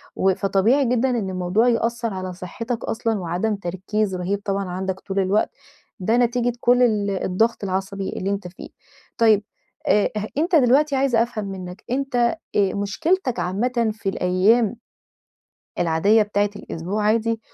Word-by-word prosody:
و 190 0 +3
فطبيعي 215 +8 +2
جدًا 250 +2 +2
إن 225 -6 -1
الموضوع 185 +6 +1
يأثّر 230 -1 0
على 185 -1 -5
صحّتك 225 +7 -5
أصلًا، 225 -2 -1
وعدم 180 +5 -1
تركيز 190 +2 -2
رهيب 190 +3 -2
طبعًا 195 -1 -1
عندك 190 +1 -3
طول 195 0 -3
الوقت. 195 +2 +2 0.5
ده 220 +6 +1
نتيجة 245 0 +1
كل 245 +1 +4
ال 210 -4 +2
الضغط 220 +5 +1
العصبي 195 0 -3
اللي 195 - -3
أنت 200 -2 -2
فيه. 180 - -11 0.5
طيّب 220 -3 +4 0.4
أ 205 -1 +3
أه 210 - -2
أنت 335 +3 +2
دلوقتي 275 +2 +4
عايزة 265 -4 +3
أفهم 230 -3 -5
منّك، 190 0 -7
أنت 270 0 -2 0.4
آآ 195 -2 +2
مشكلتك 245 - 0
عامةً 230 +4 0
في 210 -2 -3
الأيّام 195 +6 +2 1.0
العادية 175 +6 +3
بتاعة 205 0 0
الأسبوع 195 +6 -4
عادي 225 +1 +1
210 Hz, 145 wpm, -22 LUFS, 190-235 Hz, 1.0 s, كل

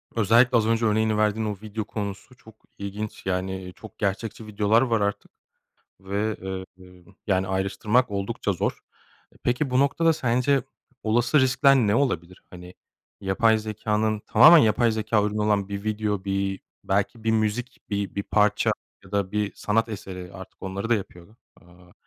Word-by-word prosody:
özellikle 115 +3 +4
az 110 -1 +1
önce 115 0 +1
örneğini 110 0 +2
verdiğin 110 +1 +1
o 105 -2 -3
video 110 0 -5
konusu 100 +3 -6
çok 110 -3 -17 0.2
ilginç. 100 +2 -6
Yani, 95 0 -3
çok 110 -3 -13
gerçekçi 105 +2 -3
videolar 105 +2 +2
var 115 -4 +1
artık 100 0 -2 0.7
ve, 100 +3 -2 0.4
eee, 90 -1 -17 0.2
yani 95 -2 +1
ayrıştırmak 105 +6 0
oldukça 100 -1 -2
zor. - - -2 0.5
E, - - -22
peki 125 +3 0
bu 125 +1 +3
noktada 165 +4 +3
sence 135 -1 +1 0.4
olası 120 +6 +2
riskler 130 +1 +4
ne 105 -5 +2
olabilir? 95 - -1
Hani, 90 0 -11 0.5
yapay 110 +3 +2
zekânın 110 0 -1
tamamen 155 +10 +8
yapay 115 -1 +3
zekâ 110 0 +1
ürünü 105 0 -2
olan 105 -2 +1
bir 100 0 -5
video, 105 -2 -2
bir 95 0 -2 0.2
belki 100 +4 -1
bir 115 - +2
müzik, 110 +3 -1
bi 100 -1 -2
bir 100 - -2
parça 105 +1 +2 0.3
ya 95 - -17
da 100 -2 -1
bir 105 -1 -1
sanat 115 +2 0
eseri, 95 -4 -7
artık 95 -1 -12
onları 95 +3 -4
da 120 - +4
yapıyor. 95 0 -7 0.2
Aaa, 90 0 -20
105 Hz, 160 wpm, -25 LUFS, 100-115 Hz, 0.7 s, tamamen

